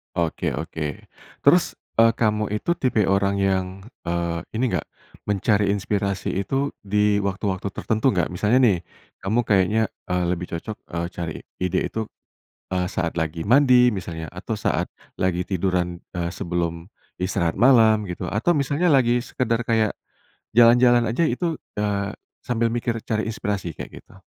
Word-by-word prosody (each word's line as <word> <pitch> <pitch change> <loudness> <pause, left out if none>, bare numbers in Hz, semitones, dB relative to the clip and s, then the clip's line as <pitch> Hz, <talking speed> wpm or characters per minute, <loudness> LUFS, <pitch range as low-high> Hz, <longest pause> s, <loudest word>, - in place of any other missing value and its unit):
Oke 85 -2 -1
oke. 75 -3 -5 0.4
Terus, - - +4 0.2
eee, 115 0 +7
kamu 105 -2 +1
itu 105 - -1
tipe 120 -5 +2
orang 100 +1 +2
yang, 95 -1 +2 0.4
eee, 85 0 -1 0.2
ini 120 +1 +1
nggak, - - -2 0.4
mencari 105 0 +2
inspirasi 100 -1 -1
itu, 135 +8 -1
di 105 0 +2
waktu-waktu 100 -1 -2
tertentu, 110 +3 +1
nggak? 90 -1 0
Misalnya 105 +7 +2
nih, 105 -7 +5 0.4
kamu 110 +5 0
kayaknya, 105 +1 +2 0.3
eee, 90 0 0
lebih 90 0 -3
cocok, 105 +6 -6
eee, 85 0 -3
cari 85 -3 -4 0.3
ide 90 0 0
itu, 110 -1 -3 0.6
eee, 90 -1 0
saat 85 -2 -2
lagi 80 0 -2
mandi 125 - +5
misalnya, 85 -6 -5
atau - - -5
saat - - 0 0.3
lagi 90 -1 +1
tiduran, 90 -2 -1 0.2
eee, 85 -1 -2
sebelum 85 -1 -3 0.3
istirahat 90 -2 -1
malam, 110 -3 +5
gitu? 90 0 -5
Atau 115 +12 +2
misalnya, 145 +4 +1
lagi 120 -3 +4
sekedar 120 -3 -1
kayak, 110 -2 +2 0.7
jalan-jalan 120 +1 +6
aja, 145 +9 +1
itu, 165 -2 -1 0.2
eee, 105 -1 -1 0.3
sambil 115 -1 0
mikir 120 0 -1
cari 110 0 -1
inspirasi, 100 -7 -3
kayak - - -8
gitu? - - -19
100 Hz, 145 wpm, -23 LUFS, 90-115 Hz, 0.7 s, eee